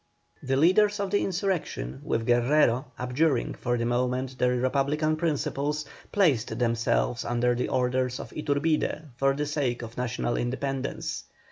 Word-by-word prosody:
The 135 0 0
leaders 205 +7 +4
of 200 -2 -2
the 205 - +2
insurrection, 180 - -2
with 115 - -1
Guerrero, 120 +1 +3
abjuring 125 +2 +1
for 120 -1 -1
the 115 - -1
moment 125 +2 -1
their 125 0 +3
Republican 140 +5 +1
principles, 150 -2 -1 0.3
placed 150 - +2
themselves 120 0 +1
under 120 0 +1
the 120 - -1
orders 125 0 0
of - - -8
Iturbide 150 0 -1
for 135 0 +2
the 145 +1 -1
sake 140 -5 -1
of 115 0 -9
national 125 -1 -1
independence. 135 +2 -3
130 Hz, 140 wpm, -27 LUFS, 120-150 Hz, 0.3 s, leaders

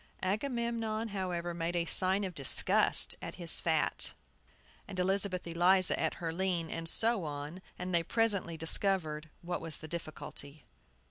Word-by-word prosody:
Agamemnon, 230 +1 -2
however, 180 -3 -3
made 170 +1 -3
a 170 -1 0
sign 190 +3 +1
of 185 -2 -4
disgust 140 -4 +5
at - - -7
his 170 -2 +2
fat, 160 -2 0 0.7
and 190 - -8
Elizabeth 190 0 +1
Eliza 180 +2 +3
at - - -1
her 165 -1 -4
lean, 175 -2 -2
and 165 0 -4
so 225 -1 +1
on, 150 +4 -6 0.2
and 180 0 -5
they 170 - +4
presently 200 -3 +1
discovered 160 -2 +1
what 175 0 -4
was 165 -1 -2
the 155 - -10
difficulty. 155 -3 -7
175 Hz, 145 wpm, -31 LUFS, 165-195 Hz, 0.7 s, disgust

